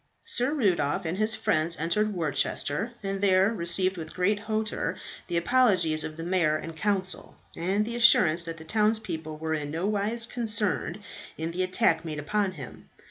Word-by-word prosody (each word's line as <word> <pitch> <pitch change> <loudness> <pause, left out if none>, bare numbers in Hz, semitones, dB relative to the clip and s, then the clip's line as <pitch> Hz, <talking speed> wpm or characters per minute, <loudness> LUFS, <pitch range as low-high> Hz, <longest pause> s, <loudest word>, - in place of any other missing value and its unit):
Sir 255 +5 +1
Rudolph 180 - +1
and 160 +2 -2
his 215 +1 +3
friends 160 -2 0
entered 210 +7 0
Worcester, 170 +3 -1
and 195 0 -3
there 195 +2 +4
received 185 0 0
with 160 -1 -7
great 200 +3 +1
hauteur 220 0 -2 0.3
the 170 - -1
apologies 170 -6 +3
of 155 0 -6
the 165 - -5
mayor 170 -3 +2
and 165 +1 -8
council, 190 +1 -2 0.2
and 195 +5 0
the 235 +1 -5
assurance 175 -8 +5
that 165 0 -5
the 160 - -10
townspeople 210 -6 -1
were 160 +1 -3
in 150 -2 -3
nowise 205 +7 -1
concerned 215 -5 -2 0.4
in 160 +1 -3
the 180 +2 -2
attack 185 -3 +2
made 155 -2 -5
upon 195 +6 -1
him. 135 -8 -11
185 Hz, 165 wpm, -27 LUFS, 160-210 Hz, 0.4 s, assurance